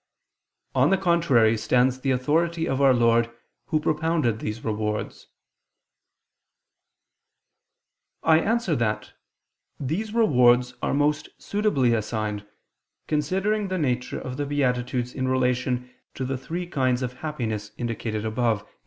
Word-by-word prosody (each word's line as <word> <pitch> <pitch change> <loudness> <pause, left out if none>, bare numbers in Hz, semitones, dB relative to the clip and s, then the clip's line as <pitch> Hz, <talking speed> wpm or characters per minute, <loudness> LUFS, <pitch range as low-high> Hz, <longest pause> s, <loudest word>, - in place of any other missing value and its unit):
On - - +4
the 195 - +3
contrary, 165 -12 +3
stands 125 +3 +2
the 135 - -2
authority 160 +6 +1
of 135 +1 -1
Our 135 -1 +6
Lord 115 -1 +3 0.4
Who 155 - +1
propounded 155 -7 0
these 105 +1 -5
rewards. 105 -1 -3 3.0
I 160 0 +5
answer 220 -3 0
that, 105 -2 -2 0.7
These 170 +11 -2
rewards 125 - +4
are - - 0
most 150 +1 +1
suitably 200 - +1
assigned, 105 -2 -2 0.6
considering 190 +8 0
the 185 0 -2
nature 125 -6 -1
of 130 0 -6
the 145 - -1
beatitudes 125 -3 -1
in 130 -1 -2
relation 125 -1 0 0.2
to 130 - -3
the 135 +1 -2
three 165 +7 -4
kinds 130 -6 0
of 125 0 -5
happiness 110 -9 -3
indicated 110 -2 -3
above 110 -1 0
(A. - - -26
130 Hz, 125 wpm, -25 LUFS, 120-155 Hz, 3.0 s, Our